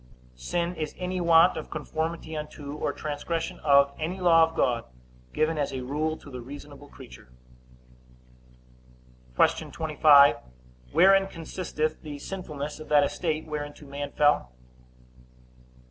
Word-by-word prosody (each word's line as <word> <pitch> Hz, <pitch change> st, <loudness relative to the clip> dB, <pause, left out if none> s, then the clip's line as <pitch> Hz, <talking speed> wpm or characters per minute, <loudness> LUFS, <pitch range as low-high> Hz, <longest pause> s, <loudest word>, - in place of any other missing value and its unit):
Sin 170 Hz, -, -2 dB
is 155 Hz, -2 st, -4 dB
any 180 Hz, 0 st, -3 dB
want 170 Hz, +1 st, +5 dB
of 155 Hz, -, -6 dB
conformity 160 Hz, +1 st, -4 dB
unto, 150 Hz, -1 st, -7 dB
or 150 Hz, -1 st, -2 dB
transgression 155 Hz, +3 st, -4 dB
of, 140 Hz, -1 st, +4 dB
any 170 Hz, +5 st, -3 dB
law 170 Hz, -2 st, +5 dB
of 165 Hz, -, -15 dB
God, 120 Hz, -6 st, +1 dB, 0.5 s
given 155 Hz, 0 st, 0 dB
as 145 Hz, -, -1 dB
a 130 Hz, -2 st, -5 dB
rule 155 Hz, +4 st, -2 dB
to 145 Hz, -, -14 dB
the 125 Hz, -1 st, -7 dB
reasonable 145 Hz, +2 st, -11 dB
creature. 130 Hz, -, -14 dB, 2.1 s
Q. -, -, +2 dB
25. 145 Hz, -5 st, +5 dB, 0.5 s
Wherein 195 Hz, +1 st, +5 dB
consisteth 160 Hz, -3 st, -4 dB
the 150 Hz, -2 st, -7 dB
sinfulness 150 Hz, -3 st, -6 dB
of 155 Hz, -, -10 dB
that 145 Hz, -1 st, +5 dB
estate 155 Hz, +1 st, -2 dB
whereinto 150 Hz, -1 st, -6 dB
man 140 Hz, 0 st, -6 dB
fell? 145 Hz, -, +2 dB
150 Hz, 130 wpm, -26 LUFS, 145-165 Hz, 2.1 s, want